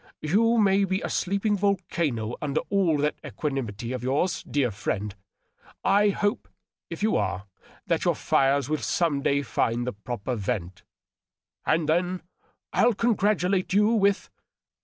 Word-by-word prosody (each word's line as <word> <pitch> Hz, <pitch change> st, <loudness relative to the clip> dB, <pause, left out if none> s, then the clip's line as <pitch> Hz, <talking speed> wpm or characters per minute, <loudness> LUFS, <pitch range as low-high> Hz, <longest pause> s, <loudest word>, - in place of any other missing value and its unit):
You 225 Hz, +9 st, +3 dB
may 200 Hz, -2 st, +4 dB
be 190 Hz, 0 st, 0 dB
a -, -, -3 dB
sleeping 200 Hz, +2 st, 0 dB
volcano 170 Hz, -, -1 dB
under 150 Hz, 0 st, 0 dB
all 185 Hz, -6 st, +3 dB
that 150 Hz, +1 st, 0 dB
equanimity 120 Hz, -6 st, -4 dB
of 125 Hz, -, -4 dB
yours, 140 Hz, +8 st, 0 dB
dear 135 Hz, -5 st, +1 dB
friend. 105 Hz, 0 st, -3 dB, 0.7 s
I 205 Hz, +1 st, +4 dB
hope, 205 Hz, +3 st, -1 dB, 0.4 s
if -, -, -6 dB
you 215 Hz, -, +2 dB
are, 95 Hz, -1 st, -1 dB, 0.4 s
that -, -, 0 dB
your -, -, +2 dB
fires 135 Hz, -1 st, +2 dB
will 155 Hz, +1 st, 0 dB
some 160 Hz, -5 st, 0 dB
day 140 Hz, +1 st, +1 dB
find 120 Hz, -2 st, 0 dB
the 125 Hz, -, -3 dB
proper 120 Hz, +3 st, -4 dB
vent. 95 Hz, -5 st, -3 dB, 0.9 s
And 155 Hz, 0 st, +2 dB
then 175 Hz, +3 st, 0 dB, 0.5 s
I'll 240 Hz, -2 st, +4 dB
congratulate 195 Hz, -5 st, +1 dB
you 210 Hz, +2 st, +4 dB
with 200 Hz, -3 st, +2 dB
155 Hz, 140 wpm, -26 LUFS, 125-200 Hz, 0.9 s, may